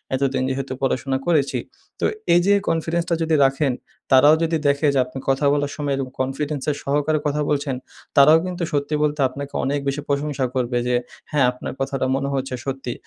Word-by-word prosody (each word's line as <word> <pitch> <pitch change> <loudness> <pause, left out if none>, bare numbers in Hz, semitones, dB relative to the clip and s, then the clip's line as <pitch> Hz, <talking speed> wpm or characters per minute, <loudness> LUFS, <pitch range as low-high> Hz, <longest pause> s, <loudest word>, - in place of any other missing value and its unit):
এতদিন 130 -1 0
যেহেতু 135 0 -3
পড়াশোনা 130 0 0
করেছি। 150 -5 +2 0.4
তো - - 0 0.3
এই 175 - +6
যে 200 - +5 0.2
কনফিডেন্সটা 165 +1 0
যদি 160 -1 +2
রাখেন, 135 0 +1 0.4
তারাও 145 +4 +7
যদি 165 0 +1
দেখে 140 +2 +2
যে 135 - +2
আপনি 130 +1 -8
কথা 135 +2 +2
বলার 145 -1 0
সময় 145 -2 -2
এরকম 130 -1 -4
কনফিডেন্সের 145 +2 -2
সহকারে 150 +2 +1
কথা 150 +1 0
বলছেন 145 -2 0 0.4
তারাও 150 +3 +8
কিন্তু 180 -1 -4
সত্যি 145 +1 0
বলতে 150 0 0
আপনাকে 140 +2 -7
অনেক 140 +1 0
বেশি 140 +2 -1
প্রশংসা 140 -1 0
করবে 125 -1 0
যে, 125 - +2 0.4
"হ্যাঁ, 145 -4 +3
আপনার 125 - -7
কথাটা 135 -1 -1
মনে 135 0 -1
হয়েছে 135 -1 -2
সত্যি।" 135 -3 -3
140 Hz, 180 wpm, -22 LUFS, 135-150 Hz, 0.4 s, তারাও